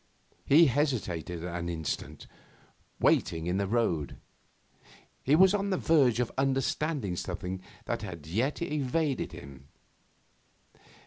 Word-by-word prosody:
He 160 +4 +7
hesitated 105 - -1
an 85 -1 -4
instant, 80 -3 -4 0.7
waiting 80 -1 +2
in 90 +2 0
the 100 0 0
road. 95 - 0 1.0
He 140 - +3
was 190 +3 +6
on 200 -1 0
the 190 - +1
verge 140 -10 +3
of 125 - 0
understanding 135 - 0
something 90 +1 -4 0.2
that - - -2 0.2
yet 115 - 0
just - - -11
evaded 145 0 -1
him. 70 -1 -11
120 Hz, 115 wpm, -29 LUFS, 85-145 Hz, 1.0 s, He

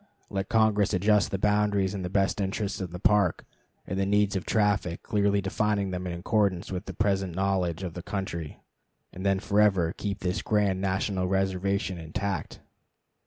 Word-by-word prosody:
Let 95 0 -2
Congress 110 -4 +3
adjust 105 +2 +3
the 95 - -2
boundaries 105 -1 +2
in 100 - -4
the 90 - -3
best 95 +1 +1
interests 100 +1 -2
of 90 - -3
the 90 - -7
Park 100 -1 +2 0.4
and 95 - -3
the 95 - +2
needs 105 0 +2
of 95 - -3
traffic, 105 -5 +1
clearly 100 -1 +1
defining 100 0 0
them 90 0 -4
in 85 -1 -4
accordance 100 -3 0
with 95 +2 -4
the - - -6
present 95 -4 0
knowledge 95 -2 0
of 90 -3 -4
the 90 - -6
country, 85 -5 -5 0.5
and 95 - -7
then 95 -1 +2
forever 95 -5 +2
keep 100 0 -4
this 90 +2 -1
grand 100 -3 +1
national 95 -1 0
reservation 95 0 0
intact. 85 +1 -4
95 Hz, 170 wpm, -27 LUFS, 90-105 Hz, 0.5 s, Congress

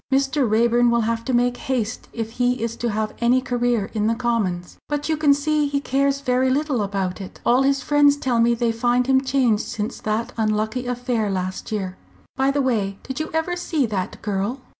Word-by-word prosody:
Mr. 270 -1 +2
Raeburn 235 +2 +3
will 235 0 +2
have 230 +1 -1
to - - -1
make 245 0 +2
haste 245 -5 -3
if 225 -1 -4
he 245 0 0
is 230 0 -2
to 240 - -1
have 215 0 -2
any 240 +2 +3
career 245 -4 -1
in 215 -1 0
the 230 - +1
Commons. 210 -8 -2
But 295 +1 -2
you 315 - +2
can 305 -2 +3
see 295 +1 +2
he 280 0 0
cares 275 0 0
very 255 0 +2
little 275 -2 0
about 195 -1 -2
it. 190 - -9
All 245 +2 +4
his 275 -1 +1
friends 290 0 +4
tell 250 -4 0
me 235 +1 +4
they 235 0 +1
find 240 +2 +1
him 265 0 +3
changed 260 -5 +2
since 210 0 -5
that 225 +3 -2
unlucky 220 +3 -1
affair 245 -3 -1
last 185 +1 -3
year. 190 -3 -3 0.4
By 265 +1 +2
the 280 0 +1
way, 205 -6 0
did 265 +2 -5
you 310 - -3
ever 320 +3 -1
see 325 -5 0
that 200 -5 -3
girl?" 210 +5 -2
245 Hz, 205 wpm, -22 LUFS, 220-270 Hz, 0.4 s, All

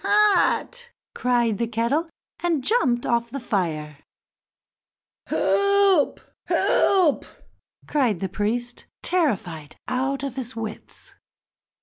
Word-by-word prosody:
hot!" 420 +4 +2 0.2
cried 240 -3 +1
the 235 - 0
kettle, 235 +9 0 0.3
and 335 -6 0
jumped 250 - +2
off 235 0 0
the 275 +4 -5
fire. 160 - -2 1.3
"Help! 400 -5 +3 0.3
help!" 365 -7 +3 0.6
cried 250 - +1
the 190 - -2
priest, 235 +6 -3 0.2
terrified 180 - -1
out 265 +2 -1
of 275 -2 -4
his 245 -2 -5
wits. 220 -1 -7
250 Hz, 95 wpm, -24 LUFS, 225-335 Hz, 1.3 s, Help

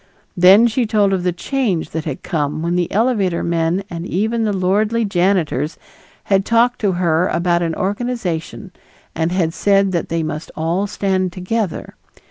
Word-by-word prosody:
Then 190 +5 +7
she 235 0 +1
told 205 -2 +2
of 190 - 0
the 180 0 0
change 195 - -2
that 160 -1 -4
had 150 -5 -5
come 150 -1 -2
when 170 +1 0
the 175 -1 -1
elevator 205 -6 +1
men 170 +2 0
and 170 -3 -6
even 220 +6 -1
the 210 - +1
lordly 210 +4 +1
janitors 175 -7 0 0.5
had 195 -1 +2
talked 235 +3 +2
to 200 -3 +1
her 175 -1 +1
about 170 0 +1
an 165 -2 -1
organization 200 -3 -3 0.4
and 160 +1 -1
had 175 -3 0
said 195 0 +2
that 170 -2 -2
they 165 0 -1
must 155 0 -5
all 170 +5 -1
stand 190 -2 -1
together. 190 +1 -3
185 Hz, 165 wpm, -18 LUFS, 170-205 Hz, 0.5 s, Then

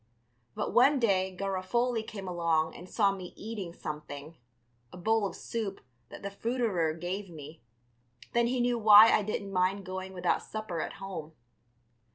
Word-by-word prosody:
But - - -2
one 275 +4 +6
day 190 -6 +1
Garofoli 200 +5 0
came 200 -3 -8
along 165 -3 0
and 180 +1 -11
saw 200 -3 +3
me 185 -2 -7
eating 210 -5 -6
something, 150 -1 -7 0.6
a - - -10
bowl 220 +2 +2
of - - -8
soup 215 -4 -4 0.3
that - - -10
the 200 - -4
fruiterer 205 -7 0
gave 180 +4 -4
me, 155 -1 -10 0.7
then 235 0 +3
he 250 +1 0
knew 240 -1 +1
why 215 +1 +9
I - - +4
didn't 200 -1 -4
mind 185 +2 +1
going 185 0 -5
without 180 -1 0
supper 215 -7 -4
at - - -4
home. 180 -5 -7
195 Hz, 160 wpm, -30 LUFS, 175-220 Hz, 0.7 s, why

